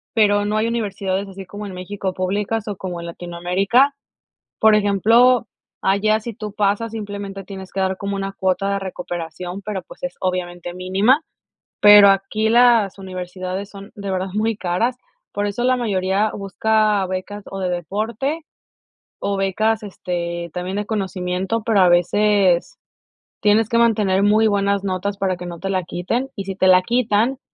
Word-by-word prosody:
pero 205 -2 +4
no 210 +1 0
hay 220 +1 +1
universidades 200 -4 -2
así 195 0 -9
como 205 +1 -7
en 190 - -8
México 190 +1 -4
públicas 205 +4 -2
o 205 - -4
como 180 -2 -5
en 170 - -7
Latinoamérica. 180 +10 +1 0.6
Por 220 -1 +6
ejemplo, 225 +4 +4 0.4
allá 215 +3 +2
si 235 +1 -6
tú 210 -1 -7
pasas 210 +2 0
simplemente 200 -2 -6
tienes 190 -1 -9
que 195 - -4
dar 190 0 0
como 200 0 -3
una 195 0 -3
cuota 190 0 0
de 200 - -1
recuperación, 180 0 -6
pero 200 -2 -4
pues - - -15
es 270 - -3
obviamente 175 -1 -3
mínima, 195 - +2 0.6
pero 205 -1 +9
aquí 195 +3 +1
las 235 -5 +4
universidades 185 +1 -5
son 200 0 -11
de 200 -2 -6
verdad 185 +1 -2
muy 215 +1 0
caras, 195 +7 0 0.4
por 205 - -1
eso 210 +4 -3
la 255 +1 +3
mayoría 200 -2 0
busca 210 0 +1
becas 190 +2 -5
o 195 - -5
de 185 -1 -1
deporte 220 - -2 0.8
o 200 - -1
becas, 215 +3 0
este, 170 -3 -4
también 185 +3 -3
en 210 - -3
conocimiento, 190 0 -2
pero 220 -4 +3
a 180 - +6
veces 190 +1 +2 0.6
tienes 210 +1 +3
que 235 - +1
mantener 210 -5 +3
muy 215 +2 +4
buenas 200 -1 +1
notas 195 +1 -2
para 190 -2 0
que 180 - -8
no 170 -1 -7
te 195 - -4
la 185 -1 +1
quiten, 225 +10 -2
y 195 - -5
si 195 -1 -4
te 190 -1 +2
la 185 0 +6
quitan 235 +3 +1
200 Hz, 170 wpm, -20 LUFS, 185-215 Hz, 0.8 s, pero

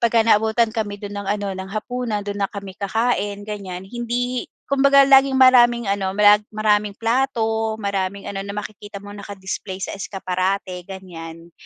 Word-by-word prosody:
pagka 230 -1 +3
naabutan 220 +1 +3
kami 215 -3 -3
do'n 205 -1 -7
ng 200 - -7
ano, 205 0 -1
ng 190 0 -6
hapunan, 220 +1 -3
do'n 205 0 -4
na 200 - +1
kami 195 -2 -9
kakain 205 -1 -1
ganiyan. 195 -4 -6
Hindi 240 +3 -3 0.2
kumbaga 275 0 +6
laging 270 0 +6
maraming 240 -4 +5
ano, 195 -1 -1
marag 210 0 +5
maraming 210 -1 +1
plato, 225 -2 0
maraming 200 -2 -2
ano, 200 - -5
na 200 +1 -5
makikita 205 -1 -7
mo 205 - -10
naka-display 195 -1 -6
sa - - -3
eskaparate 185 -1 -3
ganiyan. 170 -3 -9
205 Hz, 155 wpm, -21 LUFS, 195-230 Hz, 0.2 s, kumbaga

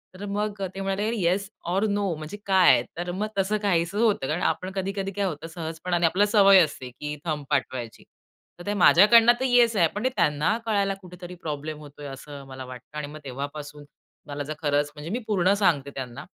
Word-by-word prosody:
तर 200 - -7
मग 205 0 -2
ते 195 - -4
म्हणाले, 195 +3 -1
"येस 190 +4 +1 0.2
ओर 195 +4 +1
नो 200 -3 0
म्हणजे 155 +6 -8
काय?" 185 -10 +5
तर 175 0 -3
मग 205 +4 -2
तसं 205 +3 +1
काहीच 175 -3 +1
होतं. 210 -11 +2
कारण 160 +4 -1
आपण 185 +4 -1
कधी-कधी 195 0 -2
काय 200 +1 -1
होतं, 160 -3 -4
सहजपणाने 170 +1 -2
आपल्याला 205 +5 +2
सवय 195 -2 +7
असते, 130 -4 -5
की 150 +4 -6
थंब 150 -3 -2
पाठवायची. 130 -5 -2 0.6
तर 175 - -10
ते 205 - -1
माझ्याकडनं 230 +5 +7
तर 260 - 0
येस 240 -2 +4
आहे, 170 -5 +4
पण 210 - -3
ते 260 - +3
त्यांना 150 +9 +2
कळायला 200 -3 +1
कुठेतरी 180 0 -10
प्रॉब्लेम 155 -2 -5
होतोय 145 -1 -11
असं 140 +1 -9
मला 130 -1 -8
वाटलं. 125 +4 -11
आणि 145 -1 -4
मग 155 +1 -10
तेव्हापासून 145 +2 -7 0.4
मला 145 0 -4
जर 155 - -5
खरंच 145 0 +1
म्हणजे 150 +3 -7
मी 240 - -1
पूर्ण 195 -2 +3
सांगते 140 -6 +2
त्यांना. 125 -3 -6
175 Hz, 195 wpm, -25 LUFS, 145-200 Hz, 0.6 s, सवय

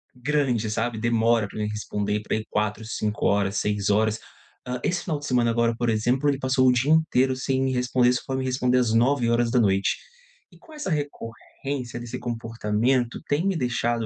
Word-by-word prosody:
grande, 125 -4 0
sabe. 115 +1 -2
Demora 115 -1 +2
pra - - -11
me 105 - -1
responder 105 0 -2
para 110 - -2
aí 110 - -5
4, 105 +1 -1
5 105 -2 -2
horas, 100 -1 +1
6 105 -1 0
horas. 110 +1 +2 0.5
Hã, 125 0 -3
esse 175 0 -1
final 155 -5 -2
de 145 - -8
semana 120 -2 +2
agora, 115 0 +1
por 120 -1 0
exemplo, 120 +6 +1
ele 140 -1 0
passou 130 -1 +2
o - - +7
dia 130 +5 +1
inteiro 135 -5 +3
sem 130 0 -1
me 130 - 0
responder. 125 0 +2
Só 125 - -1
foi 130 -1 -2
me 130 - -2
responder 125 0 +1
às 120 -3 +1
21h00. 115 -5 +2 0.6
E - - -18
com 320 - -17
essa 300 -10 -5
recorrência 135 -3 -5
desse 120 -1 -6
comportamento 115 +1 -1
tem 150 +6 +1
me 195 -2 +1
deixado, 120 -3 -1
120 Hz, 190 wpm, -25 LUFS, 110-130 Hz, 0.6 s, o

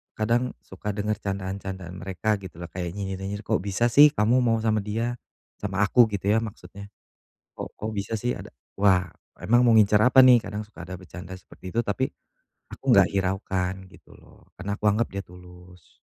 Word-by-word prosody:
kadang 120 +3 0
suka 100 +2 -6
denger 105 0 -2
candaan-candaan 95 -2 -5
mereka 95 +3 -1
gitu 95 -4 -11
loh 85 0 -9
kayak 90 -1 -5
nyinyir-nyinyir, 100 +1 -5
"Kok - - 0
bisa 100 +5 0
sih 145 +5 +9
kamu 110 +5 +3
mau 120 -2 +2
sama 110 -1 +2
dia?" 115 +4 -3 0.4
sama 100 -1 -3
aku 120 +4 +5
gitu 100 -1 -3
ya - - +4
maksudnya. 100 -2 -9 0.7
Kok - - -5
kok 110 - -4
bisa 100 +2 -4
sih 120 +3 -1
ada, - - -9 0.3
"Wah 95 -3 +3 0.3
emang 120 +3 +3
mau 120 - +5
ngincar 105 -1 +5
apa 130 +1 +6
nih?" 130 -1 +8
kadang 105 +1 -5
suka 90 - -11
ada 90 +1 -7
bercanda 90 0 -10
seperti 95 0 -11
itu, 115 - +1
tapi 120 +4 -2 0.6
aku - - -12
gak - - +5
hiraukan 95 -1 -1 0.2
gitu - - -18
loh - - -20
karena 100 +2 -5
aku 105 - -2
anggap 105 +3 +3
dia 100 0 -5
tulus. 90 -1 -16
100 Hz, 180 wpm, -25 LUFS, 95-110 Hz, 0.7 s, sih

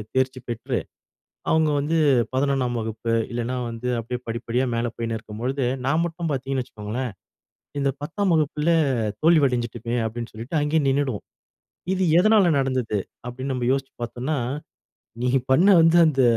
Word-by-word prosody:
தேர்ச்சி 130 0 +1
பெற்று, 120 -1 -2 0.7
அவுங்க 160 -1 +3
வந்து 155 +3 0 0.4
11ஆம் 130 -3 +1
வகுப்பு, 110 +1 -3 0.2
இல்லைனா 120 +1 -2
வந்து, 115 +2 -5
அப்படியே 125 +2 -5
படிப்படியா 120 +2 -1
மேலே 115 +1 0
போயினு 115 -1 -2
இருக்கும்பொழுது, 120 +5 -3 0.2
நான் 155 +5 +2
மட்டும் 165 -1 -4
பாத்தீங்கன்னு 135 -1 -1
வச்சுக்கோங்களேன், 115 +1 -5 0.7
இந்த 140 - +2
10தாம் 190 +4 0
வகுப்புல 155 +1 +1 0.5
தோல்வி 160 -3 +6
அடைஞ்சுகிட்டேன், 120 -1 -2
அப்படின்னு 115 +1 -6
சொல்லிட்டு 120 +8 -2
அங்கயே 150 +1 +2
நின்னுடுவோம். 135 -5 -1 0.7
இது 190 0 0 0.2
எதனால 215 0 +5
நடந்தது? 130 -5 0 0.3
அப்படினு 130 +2 -4
நம்ம 125 -1 -1
யோசுச்சு 135 0 -2
பாத்தோம்னா, 125 +5 -2 0.9
நீ 125 - +1 0.2
பண்ண 175 +9 +5
வந்து 165 +1 +5
அந்த 135 -4 +2
130 Hz, 135 wpm, -24 LUFS, 120-150 Hz, 0.9 s, தோல்வி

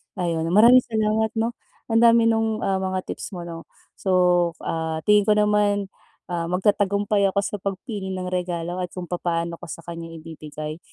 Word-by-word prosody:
Ayun, 170 -3 -1
maraming 230 +8 +7
salamat 220 -1 +1
'no. 225 +1 0 0.4
Ang 225 - +4
dami 230 0 +5
nung, 225 -1 0
ah, 190 -1 +1
mga 185 -1 -2
tips 195 - -7
mo, 175 - -6
'no? 165 -1 -8 0.3
So, 180 -2 +3
ah, 160 -1 -3
tingin 210 -1 +4
ko 210 - +5
naman, 210 -1 +2 0.4
ah, 170 -1 -2
magtatagumpay 200 +2 +2
ako 195 +1 0
sa 205 0 -4
pagpili 195 0 -4
ng 185 0 -4
regalo 175 -1 -3
at 180 -1 -5
kung 180 -2 -7
papaano 170 -1 -2
ko - - -9
sa 165 +1 -8
kanya 170 0 -7
ibibigay. 155 -1 -8
185 Hz, 170 wpm, -23 LUFS, 170-210 Hz, 0.4 s, maraming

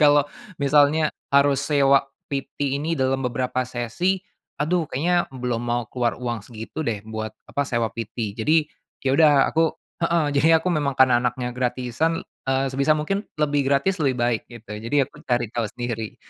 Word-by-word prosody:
kalau 145 -1 +6 0.3
misalnya 145 +2 +3 0.2
harus 140 -1 +4
sewa 140 -1 +3 0.2
PT 140 0 -2
ini 165 +2 -1
dalam 130 -1 +1
beberapa 125 0 -1
sesi, 125 - 0 0.4
aduh 160 +2 0
kayaknya 175 +6 +1
belum 125 -3 -3
mau 120 0 -1
keluar 120 -2 0
uang 120 -2 -3
segitu 110 +7 -8
deh 110 -8 -2
buat 110 0 -5
apa 140 -1 -2
sewa 115 -2 0
PT. 115 -1 -4
Jadi, 155 +7 +3 0.4
ya 130 - +2
udah 155 0 +6 0.2
aku 160 0 +3 0.3
heeh. 170 -1 +2
Jadi 145 +3 +3
aku 165 +3 -1
memang 145 -4 0
karena 125 -2 +5
anaknya 125 0 -2
gratisan, 125 +5 -1 0.2
eee, 135 +1 +2
sebisa 140 +3 +2
mungkin 175 +7 -1 0.2
lebih 145 -2 +1
gratis 165 +7 +1
lebih 135 -4 +1
baik 120 -2 +1
gitu. 115 -3 -11
Jadi 115 +6 -2
aku 150 - -16
cari 120 -1 +2
tahu 115 -3 -1
sendiri, 115 -1 -5
135 Hz, 165 wpm, -23 LUFS, 120-150 Hz, 0.4 s, kalau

